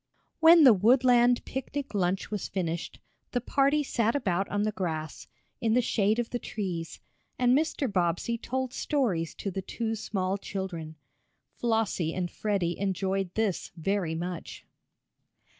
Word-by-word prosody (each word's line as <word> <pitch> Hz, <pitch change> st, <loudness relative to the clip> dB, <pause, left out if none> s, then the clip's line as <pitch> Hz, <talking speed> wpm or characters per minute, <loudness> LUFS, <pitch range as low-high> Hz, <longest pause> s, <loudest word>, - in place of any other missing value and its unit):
When 325 Hz, 0 st, +8 dB
the 255 Hz, -5 st, +9 dB
woodland 245 Hz, +3 st, +4 dB
picnic 270 Hz, +1 st, -5 dB
lunch 190 Hz, 0 st, 0 dB
was 210 Hz, -3 st, -3 dB
finished, 170 Hz, -3 st, -3 dB, 0.3 s
the 245 Hz, -, +2 dB
party 280 Hz, +4 st, +2 dB
sat 230 Hz, -3 st, 0 dB
about 195 Hz, -8 st, 0 dB
on 205 Hz, 0 st, 0 dB
the 215 Hz, -, +1 dB
grass, 160 Hz, -6 st, -4 dB, 0.3 s
in 225 Hz, -1 st, +1 dB
the -, -, +5 dB
shade 215 Hz, 0 st, +2 dB
of 240 Hz, -1 st, -2 dB
the 245 Hz, -, -2 dB
trees, 180 Hz, -8 st, -5 dB, 0.4 s
and 250 Hz, 0 st, +4 dB
Mr. 310 Hz, -1 st, 0 dB
Bobbsey 180 Hz, +2 st, 0 dB
told 260 Hz, +2 st, -3 dB
stories 215 Hz, -, -1 dB
to 195 Hz, -, -4 dB
the 190 Hz, -, -3 dB
two 225 Hz, +4 st, -3 dB
small 200 Hz, -3 st, -2 dB
children. 175 Hz, -6 st, -5 dB, 0.6 s
Flossie 220 Hz, -8 st, 0 dB
and 180 Hz, -2 st, -2 dB
Freddie 195 Hz, -5 st, -1 dB
enjoyed 195 Hz, -1 st, -1 dB
this 220 Hz, -5 st, -1 dB
very 175 Hz, -1 st, -1 dB
much. 175 Hz, +1 st, -6 dB
205 Hz, 140 wpm, -28 LUFS, 180-245 Hz, 0.6 s, the